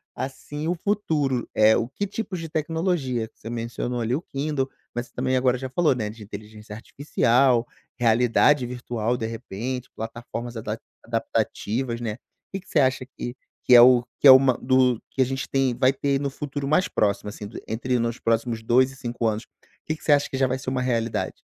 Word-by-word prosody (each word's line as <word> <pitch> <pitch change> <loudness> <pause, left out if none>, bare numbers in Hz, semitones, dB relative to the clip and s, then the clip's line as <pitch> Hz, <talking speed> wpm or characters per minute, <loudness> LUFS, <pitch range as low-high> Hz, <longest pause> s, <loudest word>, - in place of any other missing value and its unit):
assim 145 +3 -5
o 175 - +1
futuro, 155 - 0
eh, 110 +1 +6
o 115 - -1
que 170 +10 -3
tipos 200 -3 -4
de 165 -1 -6
tecnologia. 155 - -1
Você 115 - -10
mencionou 120 +1 -3
ali 115 +2 -1
o 160 - -3
Kindle, 140 -3 -2 0.2
mas 120 0 -3
você - - -30
também 130 +1 0
agora 125 0 +2
já 130 +1 -5
falou, 150 0 +2
né, 105 -3 -3
de 110 +1 -11
inteligência 105 +1 -9
artificial, 125 0 +2 0.3
realidade 125 +3 +3
virtual 120 -1 -2
de 110 - -3
repente, 120 +2 -5
plataformas 115 +1 -6
adap 110 - -4 0.2
adaptativas, 115 +2 -2
né. 110 -3 -2
O - - -30
que 195 - -2
que - - -26
você - - +2
acha 130 -1 +2
que 125 -1 -7 0.3
que 125 - +6
é 120 - +11
o 125 0 +7 0.2
que 145 - +6
é - - +13
uma 130 -1 +6
do 130 -2 +3
que 135 - -1
a - - +5
gente 135 +1 -3
tem, 135 -3 +1
vai 130 +1 +4
ter 140 0 0
no 140 0 -1
futuro 145 0 -5
mais 180 +7 +3
próximo 105 0 0
assim, 105 0 -8
do - - -9
entre 120 +3 -1
nos 115 +1 -2
próximos 115 0 0
2 130 +3 +3
e 135 - -13
5 120 -3 -3
anos? 110 +1 -2 0.4
Que 155 - -2
que - - -18
você 150 - +2
acha 145 0 +4
que 135 - -3
já 135 - +3
vai 130 +1 -1
ser 130 - -4
uma 130 -1 -1
realidade? 115 -3 -1
125 Hz, 205 wpm, -24 LUFS, 115-135 Hz, 0.4 s, é